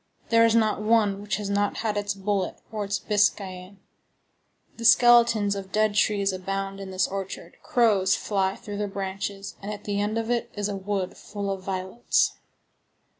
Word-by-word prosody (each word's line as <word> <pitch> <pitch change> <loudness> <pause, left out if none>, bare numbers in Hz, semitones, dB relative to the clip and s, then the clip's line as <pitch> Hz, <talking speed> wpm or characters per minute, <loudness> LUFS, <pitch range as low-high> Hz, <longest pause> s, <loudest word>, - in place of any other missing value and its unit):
There 230 0 +5
is 230 - +2
not 215 -2 +2
one 210 -2 +2
which 205 - -2
has 210 -1 -4
not 200 0 0
had 215 -1 0
its 205 0 -2
bullet 195 -1 -1 0.2
or 215 -2 -3
its 200 0 -1
biscayan.6 200 -2 -1 1.0
The 230 - -7
skeletons 235 -3 +6
of 190 -1 -7
dead 215 0 +2
trees 200 -2 +2
abound 195 +1 -4
in 195 -1 -7
this 185 0 +1
orchard. 195 -1 -6
Crows 205 -6 +3
fly 195 -2 -1
through 205 -4 -7
their 210 0 -1
branches, 195 0 -5
and 200 +1 -5
at 205 -1 -7
the 205 -1 -1
end 210 +2 -1
of 225 +1 -2
it 240 -1 -1
is 205 -1 -1
a 200 - -3
wood 195 -1 -3
full 200 -1 -5
of 195 -1 -4
violets. 190 +4 0
205 Hz, 175 wpm, -25 LUFS, 195-215 Hz, 1.0 s, skeletons